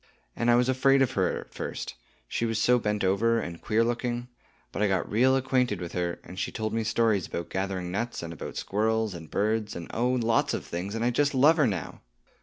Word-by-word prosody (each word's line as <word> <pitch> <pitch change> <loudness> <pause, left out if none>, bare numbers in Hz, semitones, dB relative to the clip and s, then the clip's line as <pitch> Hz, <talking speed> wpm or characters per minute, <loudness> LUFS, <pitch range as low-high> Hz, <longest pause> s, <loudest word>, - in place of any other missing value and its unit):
And 115 - 0
I 120 - +6
was 125 +1 +3
afraid 135 +1 +4
of 130 - 0
her 95 -7 0
at - - -17
first, - - -5 0.3
she - - -2
was 115 -1 0
so 125 +3 +4
bent 105 -2 -1
over, 115 +5 +2
and 85 -5 -5
was - - -26
queer 110 +2 +2
looking. 120 +1 -2 0.4
But - - -4
I 105 - +4
got 95 -2 0
real 125 +5 +3
well - - +4
acquainted 125 -6 +1
with 85 -1 -5
her, 85 -1 -2
and 90 +2 -9
she - - -2
told 110 -1 -3
me 115 0 0
stories 110 -4 +1
about 85 - -5
gathering 95 -2 -2
nuts, 120 +3 -3
and 85 0 -5
about 80 - -7
squirrels 110 +1 0
and 80 -3 -9
birds, 110 +1 0
and 85 - -7
oh, 120 +2 +1
lots 115 -3 +2
of - - -5
things, 95 +5 -4
and 115 +1 -1
I 120 - +3
just 145 +3 +1
love 150 +6 +6
her 150 -5 +4
now! 95 -8 -4
110 Hz, 235 wpm, -27 LUFS, 95-120 Hz, 0.4 s, I